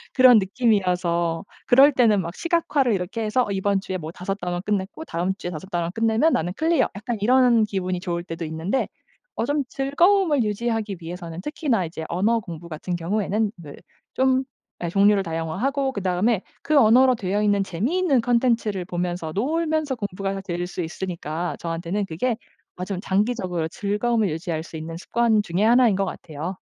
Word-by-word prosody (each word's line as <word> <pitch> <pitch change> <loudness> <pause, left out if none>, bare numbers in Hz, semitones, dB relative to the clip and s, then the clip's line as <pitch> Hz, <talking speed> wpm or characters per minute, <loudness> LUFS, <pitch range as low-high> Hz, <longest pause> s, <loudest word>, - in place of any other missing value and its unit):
그런 255 -4 +8
느낌이어서 180 -6 +1 0.2
그럴 275 +4 +7
때는 225 -6 +3
막 170 +1 -6
시각화를 305 -8 +1
이렇게 195 +4 -3
해서 235 +4 +1
'이번 195 0 +1
주에 185 -1 -4
뭐 160 -1 -7
5 190 +3 -4
단원 175 0 -3
끝냈고 205 +8 -2
다음 180 - -1
주에 175 - -5
5 175 +4 -8
단원 170 -1 -1
끝내면 225 +7 +2
나는 175 +3 0
클리어.' 320 -2 +2
약간 225 +2 -4
이런 245 -1 +5
기분이 185 -3 -2
좋을 170 -3 -3
때도 165 -1 -6
있는데 160 +11 -1 0.5
어 230 - -1
좀 290 +1 0
즐거움을 300 - +3
유지하기 215 -2 -2
위해서는 170 0 -7
특히나 250 - -1
이제 160 -1 -6
언어 215 +7 +2
공부 170 -4 -9
같은 175 +3 -4
경우에는 205 +4 -1
네, 150 -4 -10 0.4
좀 260 0 +2 0.4
예, - - -1
종류를 200 +1 +4
다양화하고 200 - -1
그 200 - -4
다음에 190 +3 +1 0.2
그 305 0 +2
언어로 255 +2 +6
되어 205 0 -1
있는 205 -1 +2
재미있는 265 - +1
콘텐츠를 230 -6 +1
보면서 175 -2 -3
놀면서 310 +3 0
공부가 195 -2 -3
될 175 -1 -3
수 180 - -5
있으니까 170 -1 -4
저한테는 170 +4 -2
그게 220 +8 -1 0.4
아 180 - -4
좀 190 -2 -4
장기적으로 190 -5 0
즐거움을 210 +3 0
유지할 160 0 -3
수 165 - -9
있는 165 +1 -6
습관 225 +2 +2
중에 180 +4 -1
1 240 +1 +6
인 195 - +1
것 195 - +1
같아요. 165 +1 -6
200 Hz, 375 characters per minute, -23 LUFS, 175-240 Hz, 0.5 s, 그런